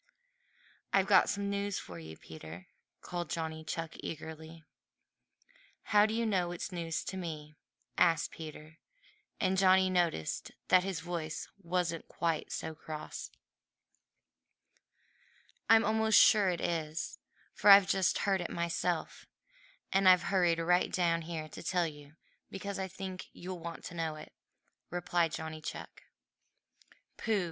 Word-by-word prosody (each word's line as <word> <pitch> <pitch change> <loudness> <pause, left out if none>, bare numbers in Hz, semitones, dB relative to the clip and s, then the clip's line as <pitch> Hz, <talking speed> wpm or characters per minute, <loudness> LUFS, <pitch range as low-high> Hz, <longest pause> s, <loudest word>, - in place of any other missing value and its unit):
"I've 195 -1 +4
got 190 -2 +5
some 200 0 -1
news 200 0 -1
for 85 -2 -8
you, 80 0 -10
Peter," 80 +2 -10 0.4
called 175 -3 -4
Johnny 160 0 -3
Chuck 165 0 -4
eagerly. 160 +1 -8 1.3
"How 210 0 +7
do 220 - -2
you 230 0 0
know 185 -5 +1
it's 175 +2 -5
news 165 -2 -3
to 190 - -5
me?" 155 -4 -6 0.4
asked 165 -2 +3
Peter, 155 0 -10 0.6
and 190 -1 +2
Johnny 190 0 +5
noticed 170 - 0 0.2
that 185 0 +6
his 190 -5 -3
voice 165 -2 -4
wasn't 175 -2 -1
quite 165 -2 -2
so 160 - -4
cross. 155 0 -7 2.4
"I'm 225 0 +7
almost 220 +1 +4
sure 205 -3 +6
it 175 -2 -2
is, 160 -2 -3 0.3
for 210 - +3
I've 195 -1 +10
just 190 -2 +2
heard 195 -2 +2
it 175 - -4
myself, 170 0 -2 0.7
and 195 -1 +6
I've 180 -1 +6
hurried 175 -3 +3
right 175 +2 +2
down 170 -2 +1
here 160 -1 -5
to - - -9
tell 180 -2 +1
you 145 -1 -9 0.3
because 200 +1 -5
I 190 - -2
think 190 0 -7
you'll 180 0 -7
want 170 0 -7
to - - -7
know 165 -2 -2
it," 155 - -11 0.6
replied 175 -1 0
Johnny 160 0 -5
Chuck. - - -8 1.1
"Pooh!" 220 -3 +1
175 Hz, 135 wpm, -32 LUFS, 160-190 Hz, 2.4 s, I've